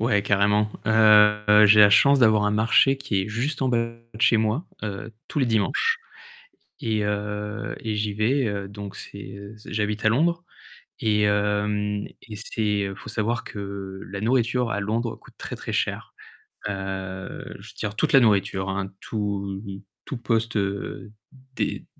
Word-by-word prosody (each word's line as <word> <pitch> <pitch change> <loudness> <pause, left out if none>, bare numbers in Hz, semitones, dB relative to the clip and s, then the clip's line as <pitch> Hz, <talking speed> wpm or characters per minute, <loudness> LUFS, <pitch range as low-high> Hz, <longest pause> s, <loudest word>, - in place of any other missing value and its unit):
Ouais, 105 -3 +2
carrément. 105 +1 +2 0.2
Heu, 105 -1 +6
j'ai 105 +1 +7
la 100 -1 +8
chance 140 +7 +6
d'avoir 110 -4 +4
un 105 - +2
marché 115 +6 +4
qui 100 -8 -1
est - - -6
juste 125 +7 -2
en 130 - +2
bas 120 - +2 0.4
de 110 - -10
chez 120 -1 +5
moi, 110 +9 0 0.2
heu, 105 +1 -5 0.2
tous 150 - -3
les 130 - +2
dimanches 110 -5 +1 0.8
et 110 -2 0
heu, 105 0 -3
et 110 -1 -3
j'y 105 0 -1
vais, 120 +6 +1
heu, 100 -2 -3
donc 100 -1 -8
c'est 100 -1 -9 0.2
z 105 - -16
j'habite 105 0 -2
à 110 - +6
Londres 170 +9 +1 0.6
et 105 -1 +1
hem, 105 0 0 0.2
et 110 - -9
c'est, 105 -1 -1
heu 100 - -3
il - - -8
faut - - -11
savoir 115 +3 -1
que 100 -2 -7
la 100 +1 -5
nourriture 120 +1 +1
à - - -1
Londres 110 +3 -2
coûte - - -19
très, - - -6
très - - -7
cher. - - -2 0.6
Heu, 95 -1 -5
je - - -13
veux - - -14
dire 105 - -4
toute 150 +8 0
la 135 - +9
nourriture, 100 -4 +2
hein, 95 0 -3
tout 100 -2 -3 0.4
tout 135 - -5
poste, 115 -1 -1
heu, 100 +2 -3 0.4
des - - -2
105 Hz, 170 wpm, -24 LUFS, 100-115 Hz, 0.8 s, la